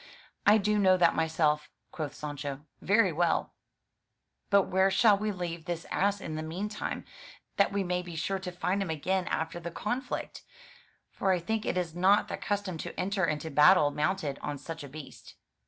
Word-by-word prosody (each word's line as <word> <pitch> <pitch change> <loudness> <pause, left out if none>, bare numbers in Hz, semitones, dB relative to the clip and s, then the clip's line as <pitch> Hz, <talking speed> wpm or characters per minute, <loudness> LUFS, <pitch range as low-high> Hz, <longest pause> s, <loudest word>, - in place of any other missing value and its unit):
"I 210 +2 +8
do 210 0 +1
know 185 -2 +5
that 180 - +4
myself," 155 -2 +1 0.2
quoth 155 -3 -5
Sancho, 145 -2 -5 0.2
"very 200 -1 +3
well; 170 +1 0 1.0
but 200 -1 +5
where 190 +1 +2
shall 205 +2 +5
we 210 +1 -2
leave 170 -4 -5
this 170 -1 -4
ass 200 +1 +1
in 160 - -6
the 155 - -3
meantime, 190 +7 -4 0.5
that 200 - +4
we 200 -1 0
may 180 0 -1
be 175 -2 -9
sure 190 +5 -1
to 185 -1 -5
find 180 +2 -1
him 195 - -2
again 180 +4 -1
after 165 +2 -2
the 170 0 -5
conflict? 240 +9 -4 0.4
— - - -32
For 195 - +2
I 185 - +3
think 215 +5 -2
it - - 0
is 175 -3 -2
not 190 +4 +3
the - - -3
custom 200 -4 -3
to - - -6
enter 190 0 +1
into 155 0 -3
battle 150 +1 +6
mounted 150 -1 -1
on 145 - -4
such 165 +2 -7
a 140 - -9
beast." 150 0 -11
180 Hz, 190 wpm, -29 LUFS, 160-195 Hz, 1.0 s, I